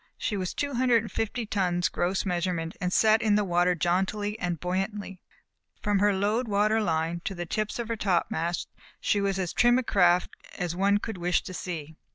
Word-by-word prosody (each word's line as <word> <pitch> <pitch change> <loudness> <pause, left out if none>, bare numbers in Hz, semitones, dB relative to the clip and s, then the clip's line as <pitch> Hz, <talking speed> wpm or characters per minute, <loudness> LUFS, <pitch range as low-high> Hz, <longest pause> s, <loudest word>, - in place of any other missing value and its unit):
She 210 - -2
was 185 -3 -3
two 285 -1 -2
hundred 240 -2 +3
and 225 - -8
fifty 225 +2 -2
tons 180 -4 0
gross 185 +3 -1
measurement 175 -3 -2
and 180 -1 0
sat 220 +3 +4
in 215 -2 +3
the 210 - +3
water 175 0 +2
jauntily 190 +5 0
and 175 -3 -2
buoyantly. 195 +1 -3 0.6
From 205 -1 +1
her 205 +1 +4
load 210 +5 0
water 215 +2 +2
line 165 -2 -1
to 195 - -3
the 175 0 -4
tips 215 +5 -2
of 235 -2 -3
her 230 - -1
topmast 175 -4 -1 0.3
she 205 - +1
was 195 -1 0
as 185 -3 -2
trim 240 0 +4
a 255 - 0
craft 180 -5 +3 0.3
as 175 -1 -2
one 200 +2 +3
could 205 -2 -5
wish 175 +1 +1
to 185 - -7
see. 160 -4 -6
195 Hz, 200 wpm, -27 LUFS, 175-210 Hz, 0.6 s, sat